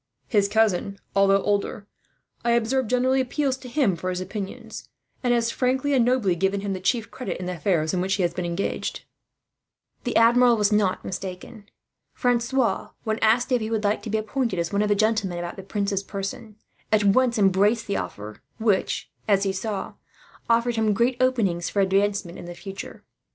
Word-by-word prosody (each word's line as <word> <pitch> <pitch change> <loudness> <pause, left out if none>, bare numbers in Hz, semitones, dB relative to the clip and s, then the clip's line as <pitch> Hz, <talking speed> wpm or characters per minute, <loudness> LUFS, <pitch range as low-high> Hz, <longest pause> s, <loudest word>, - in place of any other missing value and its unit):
His 205 -4 +2
cousin, 200 -2 +1 0.2
although 195 0 +4
older, 205 0 -1 0.6
I 235 0 +2
observe 235 +2 +1
generally 255 +2 +2
appeals 265 +1 0
to 255 -1 -10
him 240 - +2
for 185 +2 -4
his 180 0 -2
opinion; 195 +1 -6 0.5
and 245 - +2
has 235 -1 +2
frankly 265 +3 0
and 255 -3 +4
nobly 235 -7 +2
given 195 +3 0
him 200 -1 -2
the 185 - -4
chief 225 +4 0
credit, 255 - -5
in 180 - -5
the 180 - -2
affairs 165 -2 0
in 180 - 0
which 190 +2 0
he 195 - 0
has 170 -1 0
been 180 - -3
engaged." 175 +3 -3 1.0
The 245 - -3
Admiral 235 +1 +5
was 210 0 +2
not 205 -3 +1
mistaken. 190 +3 -7 0.5
Francois, 245 0 +1
when 220 0 -1
asked 240 +4 +3
if 250 -2 +2
he 220 - -3
would 220 -1 -1
like 205 +1 +1
to 225 - -7
be 220 - +1
appointed 220 -1 -2
as 170 +2 -2
one 200 - +2
of 210 - +1
the 205 - +4
gentlemen 215 -4 +1
about 175 0 -5
the 195 - -8
prince's 200 0 -2
person, 200 +2 -6 0.4
at 215 -1 +4
once 235 +4 +3
embraced 205 +3 +3
the 200 - -1
offer; 105 +1 -6 0.2
which, 215 -4 0 0.2
as 200 -2 +3
he 195 -1 0
saw, 195 0 -4 0.6
afforded 235 0 +2
him 220 -1 +2
great 235 +5 +2
openings 210 -10 +1
for 205 - -1
advancement 195 -2 +1
in - - -8
the 175 0 -8
future. 195 +2 -8
210 Hz, 190 wpm, -24 LUFS, 195-235 Hz, 1.0 s, Admiral